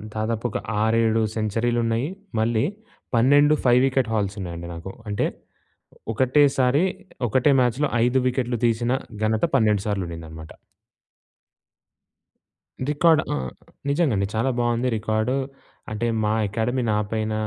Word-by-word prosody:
దాదాపు 110 +2 -2
ఒక - - -3 0.3
ఆరేడు 115 0 +2
సెంచరీలు 115 +2 0
ఉన్నాయి. 115 +5 0 0.3
మళ్ళీ 110 0 +1 0.5
12 145 +5 +5
5 125 0 +5
వికెట్ 130 -3 +1
హాల్స్ 105 -2 -1
ఉన్నాయండి 85 -1 -6
నాకు. 85 +3 -7 0.2
అంటే 100 - 0 0.9
ఒకటేసారి 135 - +3 0.4
ఒకటే 130 +6 +3
మ్యాచ్‍లో 125 +4 +1 0.2
5 130 +2 +2
వికెట్లు 125 -2 -1
తీసిన 120 +1 +1 0.3
ఘనత 110 +6 +2
12 105 -5 +3
సార్లు 100 -2 -1
ఉండిందనమాట. 80 -1 -9 2.4
రికార్డ్ 155 +1 +4
ఆహ్, 65 -3 -3 0.4
నిజంగా 145 -2 +2
అండి. 100 0 0
చాలా 125 +4 +1
బావుంది 120 +1 +1
రికార్డు 110 +4 0 0.6
అంటే 120 +2 -1 0.2
మా 105 - +1 0.2
అకాడమీ 115 +5 -1
నాపైన 110 +1 -1
115 Hz, 115 wpm, -23 LUFS, 105-130 Hz, 2.4 s, 12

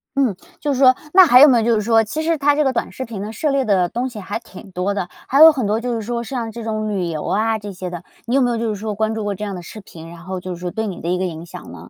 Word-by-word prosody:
嗯， 260 -8 +1 0.2
就 290 -2 -1
是 260 - -3
说 255 -2 +6 0.2
那 375 0 +9
还 250 -6 +7
有 295 - +10
没 250 -3 +5
有 225 - +1
就 235 - +3
是 215 - 0
说， 225 +1 +3
其 265 +9 -4
实 325 0 0
它 290 +1 +3
这 300 - +2
个 265 - +2
短 245 - -3
视 260 - -6
频 225 -5 -7
呢， 215 - -6
涉 295 +7 -1
猎 275 -1 +1
的 185 -4 +2
东 245 +6 -2
西 220 -4 -9
还 200 +2 -4
挺 225 -3 -13
多 180 +3 -2
的。 185 -3 -3 0.2
还 275 +3 +3
有 320 0 +11
很 265 -7 -2
多， 210 +2 0
就 240 0 -3
是 225 - -3
说 235 +2 -3
像 235 -2 -4
这 235 +1 -8
种 215 -1 -3
旅 190 -4 -2
游 155 -2 -4
啊， 220 +2 0
这 205 -2 -8
些 180 0 -6
的。 175 -1 -7 0.2
你 240 +3 -1
有 275 - +4
没 245 -1 +2
有 235 - -1
就 230 -1 -2
是 210 - -2
说 215 0 -3
关 220 +2 -1
注 220 - -3
过 205 -1 -2
这 205 - -7
样 200 -2 -4
的 180 - -7
视 215 +5 -10
频， 165 -3 -12
然 170 - -12
后， 185 0 -5
就 185 0 -6
是 175 - -10
说 180 - -3
对 220 +3 -3
你 195 - -6
的 170 - -3
一 180 - +1
个 185 - -1
影 165 -2 -6
响 - - -10
呢？ - - -12
220 Hz, 375 characters per minute, -19 LUFS, 190-250 Hz, 0.2 s, 有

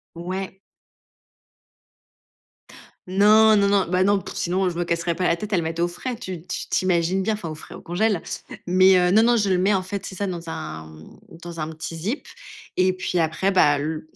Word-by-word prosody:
Ouais. 185 +3 -5 2.5
Non, 215 +3 +5
non, 200 0 +3
non, 200 -1 +2
bah 185 +1 +2
non, 200 0 +3
pff, - - -8
sinon, 185 +1 0
je 170 - -7
me 175 - 0
casserais 170 0 -1
pas 180 - 0
la 170 - +3
tête 210 +4 -7
à - - +4
le 170 - 0
mettre 165 +1 -2
au 175 - +2
frais. 250 +8 -5
Tu 185 -7 -7
t - - -26
tu - - -5
t'imagines 180 0 +1
bien, 220 0 +1
enfin, 175 -6 -6
au 155 - -6
frais, - - -12
au - - -10
congélateur, 195 +1 0 0.5
mais 185 +1 +6
heu, 180 0 +3
non, 220 +4 +5
non, 240 0 +4
je 205 -3 +1
le 185 - +2
mets, 195 +3 +2
en 190 - +1
fait, 190 +1 -5
c'est - - -7
ça, 200 +1 -3
dans 170 -2 -6
un, 155 - -6
mmh, 80 0 -15 0.2
dans 170 -1 -8
un 155 0 -3
petit 160 +1 -7
zip 205 - -4 0.5
et 185 0 +3
puis, 185 -1 -3
après 165 +4 +1
bah, 150 -6 +4
l 155 +2 -3
185 Hz, 220 wpm, -23 LUFS, 170-200 Hz, 2.5 s, mais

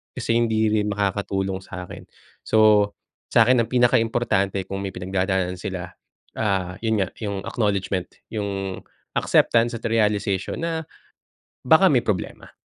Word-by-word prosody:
Kasi 115 - 0
hindi 110 -2 +2
rin 105 -1 +1
makakatulong 100 -1 -1
sakin. 90 -1 -9 0.4
So, 105 -2 +4 0.4
sakin 120 +2 +5
ang - - -18
pinaka-importante 115 -5 +2
kung 95 - -3
may 95 -2 -5
pinagdadaanan 95 0 -1
sila, 90 -1 -5 0.5
ah, 95 -4 -1
yun 110 -2 +2
nga, 95 - -1
yung 100 -3 -3
acknowledgement, 100 -4 -1 0.2
yung 100 -3 -4 0.4
acceptance, 120 0 +3
at - - -11
realization 105 - 0
na, 165 -1 -2 0.8
baka - - +6
may - - +3
problema. - - -3
100 Hz, 125 wpm, -23 LUFS, 95-110 Hz, 0.8 s, baka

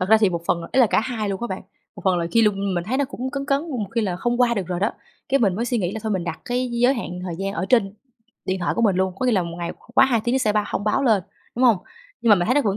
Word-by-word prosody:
Thật 185 - -1
ra 220 - +7
thì 210 -3 +3
một 170 -1 -2
phần 170 - +1
là 165 - -8
ý 265 - +4
là 245 - +6
cả - - +2
hai 220 -3 -3
luôn 195 -1 -3
á - - 0
bạn. 190 -4 -5 0.3
Một - - -10
phần 185 -2 +3
là 170 - -1
khi 230 -1 +5
lung 200 -2 +1
mình 175 -1 -1
thấy 245 +6 -1
nó 280 - +2
cũng 260 -1 -5
cấn 275 0 -3
cấn, 275 -1 +2
một 220 -7 -3
khi 230 - +2
là 190 -5 -1
không 240 +5 -1
qua 240 -1 +4
được 195 -5 -2
rồi 180 0 -3
đó, 205 - +2 0.4
cái 275 +1 +2
mình 200 -5 +3
mới 235 - -1
suy 245 -1 0
nghĩ 180 -1 -1
là 220 - -5
thôi 220 -1 -1
mình 185 -3 -1
đặt 170 -2 -5
cái 250 +1 -1
giới 245 +3 +3
hạn 180 -7 -5
thời 180 -2 -4
gian 195 0 -2
ở 185 -2 -2
trên 205 -5 +3 0.5
điện 190 0 -1
thoại 175 - 0
của 235 - 0
mình 200 -5 +3
luôn, 190 0 0
có 255 - 0
nghĩa 250 - +3
là 190 -4 +2
1 170 0 -6
ngày 170 0 -3
q - - -25
quá - - +7
2 235 -4 +1
tiếng 240 +2 +1
nó - - +3
sẽ 220 -5 +1
bao 210 0 +1
thông 205 - -2
báo 215 +6 +1
lên, 220 -7 +3 0.3
đúng 255 - +2
hông? 235 -4 +6 0.4
Nhưng 230 - +2
mà 210 - +8
mình 175 -1 0
thấy 250 - +2
nó 290 - +4
vẫn 200 -4 0
210 Hz, 355 wpm, -22 LUFS, 185-245 Hz, 0.5 s, mà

